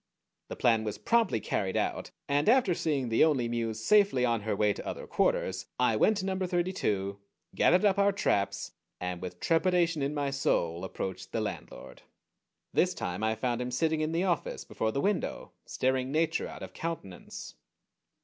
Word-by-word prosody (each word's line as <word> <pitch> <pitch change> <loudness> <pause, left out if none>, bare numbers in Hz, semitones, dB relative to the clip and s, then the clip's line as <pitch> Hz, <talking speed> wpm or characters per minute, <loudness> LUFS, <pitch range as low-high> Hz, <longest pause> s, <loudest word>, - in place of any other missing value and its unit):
The - - -6
plan 115 -2 +3
was 105 -1 -3
promptly 230 - +2
carried 95 -2 -1
out, - - -1 0.2
and 145 +5 +2
after 240 -6 +4
seeing 145 -7 -1
the 115 - +4
Only 140 -7 +2
Muse 115 -2 -3
safely 200 -12 +4
on 115 -2 +1
her 105 0 -1
way 105 0 +2
to - - -8
other - - -5
quarters 95 0 0
I 125 -3 +3
went 215 - +3
to 190 - -2
number 190 -1 -1
thirty 175 +1 0
two, 100 - -1 0.3
gathered 180 +4 +4
up 200 -1 +3
our 200 0 +5
traps, 100 - 0 0.3
and 90 -1 -4
with 90 -1 -7
trepidation 170 -1 +2
in 140 +2 -1
my 140 -1 -1
soul 85 -11 0
approached 95 0 -5
the 115 - 0
landlord. 110 - -7 0.7
This 180 0 +2
time 90 - -4
I 110 0 +1
found 120 +2 -1
him 125 - -2
sitting 155 +5 0
in 155 +1 0
the 165 +2 0
office, 175 -6 -1
before 110 - -2
the 140 - -1
window, 205 -1 -1 0.2
staring 130 0 0
Nature 160 +2 +1
out - - -9
of - - -9
countenance. 160 - -6
130 Hz, 180 wpm, -30 LUFS, 110-175 Hz, 0.7 s, our